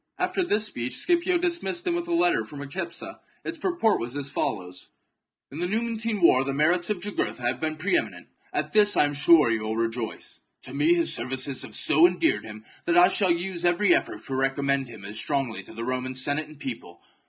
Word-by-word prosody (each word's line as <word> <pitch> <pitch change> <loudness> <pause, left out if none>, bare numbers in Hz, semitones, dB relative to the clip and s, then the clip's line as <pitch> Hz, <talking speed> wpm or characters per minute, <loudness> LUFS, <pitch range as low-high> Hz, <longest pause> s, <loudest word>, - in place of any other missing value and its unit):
After - - -1
this 215 -10 +1
speech 125 - -4
Scipio 350 +1 +2
dismissed 350 +1 -2
him 350 - +1
with 345 0 -2
chap. 345 - -3
a - - +2
letter 355 +2 +2
for 145 - -11
Micipsa. 170 - -6 0.2
Its 330 - -6
purport 345 - +1
was 120 +4 -5
as 140 -1 -4
follows: 90 0 -4 0.2
— - - -56
" - - -63
In 145 - -7
the 175 - -1
Numantine 225 0 -2
war 130 -5 +6
the 135 0 -3
merits 170 +5 +2
of 205 -4 -2
Jugurtha 200 -10 -3
have 120 +1 -1
been 155 -1 -1
pre 155 - 0
eminent; 340 - -2 0.3
at - - -3
this 210 -1 +4
I - - +5
am 145 - -2
sure 150 -3 +5
you 115 -1 0
will 110 +1 -3
rejoice. 115 0 -4 0.2
To 130 - -10
me 150 +5 +3
his 170 -1 +2
services 130 +1 -2
have - - -7
so 160 +3 +6
endeared 175 -12 0
him 110 0 -10 0.2
that 170 - +2
I 180 +1 +7
shall 195 -1 +1
use 175 +1 -2
every 175 +2 +3
effort - - -2
to 135 - -5
recommend 135 0 0
him 110 -4 -11
as 105 +2 -5
strongly 135 -5 -2
to - - -15
the 115 - -5
Roman 130 +1 -3
Senate 145 +4 0
and 155 -2 -15
people. 115 -10 -8
155 Hz, 220 wpm, -25 LUFS, 130-205 Hz, 0.3 s, I